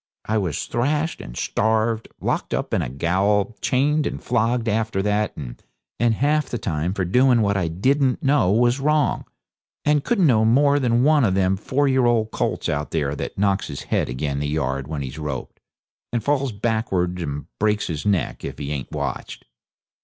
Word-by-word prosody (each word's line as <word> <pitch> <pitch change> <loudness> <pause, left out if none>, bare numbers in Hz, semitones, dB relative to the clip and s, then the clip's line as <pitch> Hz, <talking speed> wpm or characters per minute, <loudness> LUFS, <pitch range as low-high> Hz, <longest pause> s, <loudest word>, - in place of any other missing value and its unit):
I 110 0 +1
was 90 -7 -2
thrashed 150 +6 -1
and - - -9
starved, 110 +1 0
locked - - -1
up - - -3
in - - +2
a - - -3
gaol, 95 - +1
chained 145 +3 +2
and - - -4
flogged 120 0 0
after 110 -2 0
that, 105 0 +1
and 75 - -4
half 150 +4 +1
the 120 - -2
time 85 -3 -2
for 95 - -1
doing 125 +5 +4
what 100 -1 +1
I 90 -3 0
didn't 130 - +1
know 135 -9 +3
was 120 +4 +3
wrong, 150 +1 +1 0.6
and 150 -1 +3
couldn't 200 -7 +2
know 115 -7 +4
more 140 +5 +4
than 120 -2 +2
one 150 -1 +4
of 95 -5 +2
them 95 0 +2
four 135 +8 0
year 130 -2 +3
old 110 -2 +1
colts - - -2
out 75 +1 -2
there 75 -3 -1
that - - -5
knocks 100 -1 +1
his 70 -2 -6
head - - +1
agin 70 +2 -2
the 75 - -2
yard 70 -3 -2
when 75 -3 -4
he's 65 +4 -7
roped, 75 -4 -5 0.5
and 120 -2 -1
falls 140 -1 +1
backards 100 -5 -1
and 70 -3 -4
breaks 105 0 +1
his 80 -4 -4
neck 100 -7 0
if - - -5
he 70 0 -5
ain't 70 -3 -4
watched. - - -5
110 Hz, 185 wpm, -22 LUFS, 85-125 Hz, 0.6 s, doing